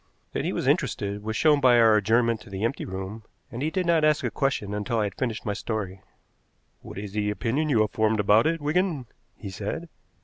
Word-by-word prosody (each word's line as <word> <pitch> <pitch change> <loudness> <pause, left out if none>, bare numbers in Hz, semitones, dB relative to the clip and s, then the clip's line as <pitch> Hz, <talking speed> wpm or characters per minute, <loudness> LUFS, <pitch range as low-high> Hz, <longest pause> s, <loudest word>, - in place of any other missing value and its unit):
That - - -2
he - - 0
was - - -3
interested 100 0 0
was 110 +1 -4
shown 150 -2 +4
by 125 -2 +6
our 115 -2 +6
adjournment 115 +2 +2
to 115 - -13
the 95 +1 -5
empty 115 +4 -1
room, 95 +3 -6 0.3
and 120 +1 -6
he 150 - 0
did 185 +2 -1
not 170 -2 +3
ask 150 -1 +3
a - - -1
question 135 -8 -1
until 105 +3 -2
I 110 - +2
had 100 - -3
finished 120 -4 -3
my 105 - -1
story. 100 -3 -4 0.8
"What - - -10
is 100 0 -6
the 105 0 -1
opinion 125 +9 -1
you 115 -6 +3
have 105 - +1
formed 110 0 +1
about 105 +6 +4
it, 165 +1 0
Wigan?" 155 -2 0 0.3
he 100 -3 -8
said. 110 - -5
110 Hz, 225 wpm, -26 LUFS, 105-140 Hz, 0.8 s, by